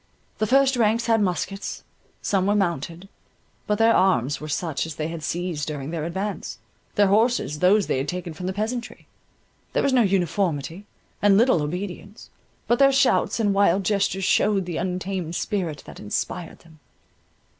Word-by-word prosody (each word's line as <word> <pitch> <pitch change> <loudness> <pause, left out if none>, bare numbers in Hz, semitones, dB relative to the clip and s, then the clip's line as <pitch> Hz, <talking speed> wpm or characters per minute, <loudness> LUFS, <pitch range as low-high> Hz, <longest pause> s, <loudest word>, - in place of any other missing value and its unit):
The 215 - +1
first 270 +2 +4
ranks 225 0 +2
had 225 -2 +3
muskets; 195 +1 -3 0.4
some 195 -1 +1
were 205 - +3
mounted, 170 -1 -2 0.6
but 210 - +1
their 225 +1 +5
arms 145 -8 +2
were 155 - -6
such 160 0 -2
as 160 - -7
they 155 0 -3
had 165 -1 -6
seized 165 -1 -3
during 145 -1 -5
their 160 -2 -3
advance, 190 +5 -4 0.4
their 205 - +5
horses 210 - +2
those 195 +3 +4
they - - 0
had 135 - -3
taken 180 0 -4
from 180 +4 -6
the - - 0
peasantry; 230 +5 -4 0.7
there - - +1
was 275 - +2
no 255 - +5
uniformity, 180 -3 0 0.4
and 200 -1 +5
little 230 -7 +4
obedience, 185 +6 -6 0.4
but 240 - +2
their 275 0 +6
shouts 270 -3 +2
and 205 -3 +2
wild 195 -1 +3
gestures 195 -1 0
showed 195 0 +2
the 175 -2 -4
untamed 180 -1 -3
spirit 175 -8 -2
that - - -11
inspired 165 - -4
them. 160 -2 -19
190 Hz, 165 wpm, -24 LUFS, 165-210 Hz, 0.7 s, their